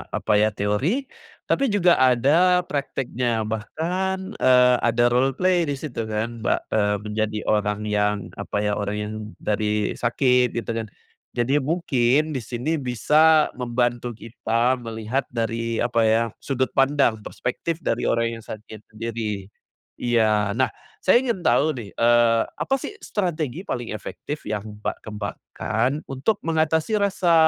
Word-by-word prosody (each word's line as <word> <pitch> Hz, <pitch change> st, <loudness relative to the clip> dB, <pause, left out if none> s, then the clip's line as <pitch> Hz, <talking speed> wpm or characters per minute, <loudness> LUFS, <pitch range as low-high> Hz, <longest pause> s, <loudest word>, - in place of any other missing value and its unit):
apa 105 Hz, -, +2 dB
ya, 105 Hz, -, +4 dB
teori, 110 Hz, -, 0 dB, 0.4 s
tapi 275 Hz, -, +1 dB
juga 180 Hz, -, +3 dB
ada 150 Hz, +9 st, +4 dB
prakteknya 125 Hz, -6 st, -2 dB
bahkan, 180 Hz, -, -3 dB
eee, 125 Hz, -1 st, +6 dB
ada 120 Hz, 0 st, +2 dB
roleplay 155 Hz, +8 st, +2 dB
di 145 Hz, -, -1 dB
situ 125 Hz, -6 st, -5 dB
kan 110 Hz, +2 st, -3 dB
ba 110 Hz, -, 0 dB
eee, 105 Hz, -1 st, +2 dB
menjadi 105 Hz, 0 st, -2 dB
orang 105 Hz, 0 st, 0 dB
yang 105 Hz, 0 st, +1 dB, 0.2 s
apa 105 Hz, -, -2 dB
ya, 105 Hz, 0 st, 0 dB
orang 105 Hz, 0 st, -2 dB
yang 105 Hz, 0 st, -4 dB, 0.3 s
dari 105 Hz, 0 st, 0 dB
sakit, 125 Hz, 0 st, +2 dB
gitu 115 Hz, 0 st, -2 dB
kan. 115 Hz, -1 st, -3 dB, 0.5 s
Jadi 130 Hz, +5 st, +2 dB
mungkin 145 Hz, -1 st, +1 dB
di 135 Hz, -, -2 dB
sini 125 Hz, +7 st, -2 dB
bisa 150 Hz, +5 st, +4 dB
membantu 120 Hz, -1 st, -1 dB
kita 115 Hz, +3 st, 0 dB
melihat 115 Hz, +3 st, -3 dB
dari 115 Hz, -1 st, -2 dB
apa 120 Hz, -1 st, 0 dB
ya, 110 Hz, +1 st, +4 dB, 0.2 s
sudut 130 Hz, -1 st, -1 dB
pandang 135 Hz, -4 st, +2 dB
perspektif 160 Hz, -, -4 dB
dari 115 Hz, -, 0 dB
orang 115 Hz, 0 st, 0 dB
yang -, -, -14 dB
sakit 110 Hz, 0 st, -9 dB
sendiri, 110 Hz, -3 st, -4 dB, 0.5 s
iya. 110 Hz, -4 st, +2 dB
Nah, 130 Hz, +3 st, +1 dB, 0.3 s
saya 185 Hz, -, +5 dB
ingin 235 Hz, -8 st, -2 dB
tahu 155 Hz, -1 st, +3 dB
nih, 110 Hz, -4 st, -7 dB
eee, 115 Hz, -1 st, +4 dB
apa 270 Hz, -, 0 dB
sih 340 Hz, -, -6 dB
strategi 170 Hz, -, -2 dB
paling 120 Hz, -, -4 dB
efektif 150 Hz, +8 st, -7 dB
yang 105 Hz, 0 st, -4 dB
Mbak 105 Hz, -, -4 dB
kembangkan 110 Hz, +6 st, -2 dB
untuk 135 Hz, +11 st, -1 dB
mengatasi 160 Hz, +5 st, +1 dB
rasa 190 Hz, -4 st, +2 dB
120 Hz, 140 wpm, -23 LUFS, 110-150 Hz, 0.5 s, eee